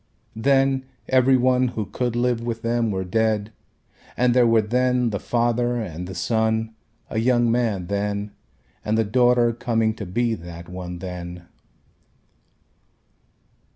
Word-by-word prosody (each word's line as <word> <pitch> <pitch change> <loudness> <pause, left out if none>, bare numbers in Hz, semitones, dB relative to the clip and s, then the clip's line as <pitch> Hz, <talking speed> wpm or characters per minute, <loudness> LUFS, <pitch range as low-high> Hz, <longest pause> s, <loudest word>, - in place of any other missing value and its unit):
Then 135 +2 +2 0.2
every 130 0 +4
one 130 0 +3
who 115 -3 -3
could 120 +3 -3
live 120 -1 +1
with 115 -1 -4
them 115 0 +1
were 95 -2 -2
dead 110 +2 0 0.6
and 125 -1 +3
there 125 -1 +5
were 115 -1 +4
then 125 +1 +1
the 100 - -2
father 120 +1 0
and 90 -7 -5
the 95 - -7
son 110 +3 0 0.4
a 110 - 0
young 120 0 +3
man 115 -6 0
then 100 +1 -2 0.5
and 110 +1 0
the 115 - +3
daughter 120 +2 +3
coming 115 -1 0
to 105 -3 -7
be 115 +5 0
that 85 -3 -8
one 90 0 -7
then. 90 -1 -7
115 Hz, 140 wpm, -23 LUFS, 100-120 Hz, 0.6 s, there